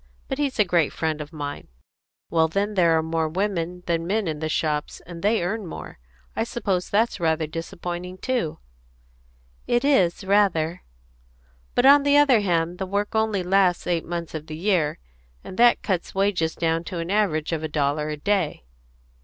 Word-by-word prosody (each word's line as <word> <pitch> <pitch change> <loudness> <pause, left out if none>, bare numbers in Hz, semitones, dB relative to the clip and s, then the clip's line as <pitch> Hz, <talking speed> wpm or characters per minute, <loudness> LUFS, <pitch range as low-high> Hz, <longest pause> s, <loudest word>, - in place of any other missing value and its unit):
But 270 0 -4
he's 280 -3 -1
a 210 - +4
great 175 -4 +2
friend 155 -1 -2
of 150 +1 -8
mine. 145 -3 -6 0.6
Well, 160 -1 +3
then, 200 +5 -1
there 170 -4 +4
are 160 - +1
more 160 0 -1
women 180 -1 -2
than 165 -1 -1
men 210 0 0
in 155 -2 -3
the 155 0 -2
shops, 150 -1 -1
and 170 -1 -9
they 210 -1 +2
earn 200 +2 -3
more. 160 - -9 0.4
I - - 0
suppose 200 -6 -2
that's 220 +1 +1
rather 160 -1 +1
disappointing 175 +3 -6
too." 245 - -2 1.1
"It 240 +3 +1
is, 195 -11 +3
rather." 190 -5 +2 0.9
"But, 245 - +3
on 285 +1 +8
the 285 0 +4
other 280 -5 +5
hand, 175 -2 0
the 190 - -3
work 205 +2 -2
only 220 -3 +1
lasts 185 -1 +2
eight 170 -2 0
months 170 -1 -5
of 155 -1 -6
the 155 - -6
year, 175 -4 +1 0.5
and - - -9
that 240 0 +5
cuts 185 -3 -2
wages 190 -5 +1
down 165 0 0
to 180 - -5
an 170 +2 -3
average 180 -8 +1
of 165 -2 -1
a 160 - -2
dollar 150 0 -1
a 150 - -4
day." 170 - -1
175 Hz, 180 wpm, -24 LUFS, 160-205 Hz, 1.1 s, on